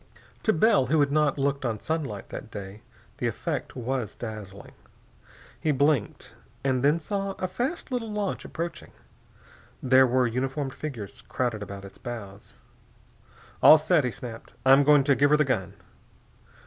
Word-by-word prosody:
To 220 - +3
Bell, 160 - +3
who 155 +4 +2
had 140 -1 +3
not 150 -1 +2
looked 140 0 0
on 115 -4 -2
sunlight 145 -10 -4
that - - -7
day, 100 0 -8 0.4
the - - -1
effect - - -4
was 125 -3 -3
dazzling. 105 -3 -8 0.9
He 155 - -1
blinked, 140 -4 0 0.3
and 130 -2 +1
then 150 +4 +4
saw 195 +3 -3
a 185 - -3
fast 250 - -3
little 235 -3 -2
launch 205 -2 -2
approaching. 170 0 -6 0.9
There 130 0 +5
were 125 +1 +2
uniformed 130 +3 -2
figures 120 -10 -7
crowded 120 -4 -2
about 100 -1 -7
its 95 - -13
bows. 110 -6 -8 1.1
"All 155 - +10
set!" 155 0 +2
he 125 - 0
snapped. 115 -1 -9
"I'm 135 +2 +7
going 145 -1 +5
to 140 0 +4
give 145 +2 +3
her 150 - +5
the 150 - +3
gun." 100 -7 -2
135 Hz, 155 wpm, -26 LUFS, 115-155 Hz, 1.1 s, All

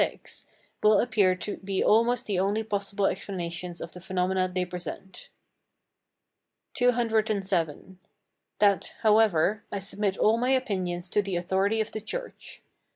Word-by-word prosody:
], - - -35
will 210 -1 +5
appear 200 -6 +3
to 200 +3 -5
be 195 0 -2
almost 235 +2 +3
the 195 -4 -1
only 205 +3 +1
possible 200 -1 -1
explanations 175 -3 -3
of - - -7
the 180 - -11
phenomena 185 0 0
they 180 0 -1
present. 180 +1 -8 1.4
CCVII. 215 - 0 0.6
That, 200 -2 +2
however, 210 -3 +3
I - - -2
submit 195 0 -2
all 220 +2 +3
my 250 +2 +1
opinions 190 -9 -1
to 210 - +3
the 195 -2 -4
authority 190 +5 +1
of 220 - -4
the 220 - -5
church. - - -7
200 Hz, 135 wpm, -27 LUFS, 185-220 Hz, 1.4 s, will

